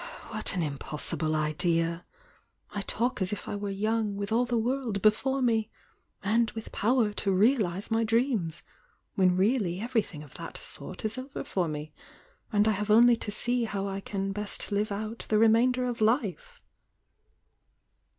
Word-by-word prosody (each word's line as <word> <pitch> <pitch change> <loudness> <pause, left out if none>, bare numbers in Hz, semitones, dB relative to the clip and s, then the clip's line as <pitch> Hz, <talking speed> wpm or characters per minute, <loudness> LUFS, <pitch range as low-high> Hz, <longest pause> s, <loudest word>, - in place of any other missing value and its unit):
"What 215 -2 -2
an 175 - 0
impossible 150 +2 -2
idea! 165 +2 0 0.7
I 205 - -3
talk 235 +3 -1
as 185 - 0
if 210 - -5
I - - -3
were 205 0 -3
young, 215 +1 0
wWh 200 +1 -4
all 240 +3 +3
the 240 -1 0
world 240 -2 -1
before 265 +5 +3
mel— 225 -3 +2 0.6
and 225 +3 +2
with 225 - -7
power 230 -1 +2
to 200 -1 -1
realise 200 -1 +2
my 225 0 +2
dreams!— 225 - 0 0.5
when 185 -2 +3
really 190 -3 +1
everything 220 -9 -2
of 145 - -14
that - - -7
sort - - -5
is 220 +4 -1
over 265 +2 -6
for 180 -3 -1
me, 150 0 -5 0.6
and 210 0 +3
I - - +5
have 210 +1 -2
only 235 +3 +7
to 215 - -5
sej 240 +3 0
how 200 -2 -3
I 195 0 -3
can 195 0 -3
best 210 +1 -3
live 205 +1 0
out 215 +3 -5
the 215 - +3
remainder 235 +3 +4
of 245 -2 -3
life!" 295 - 0
215 Hz, 165 wpm, -28 LUFS, 195-235 Hz, 0.7 s, only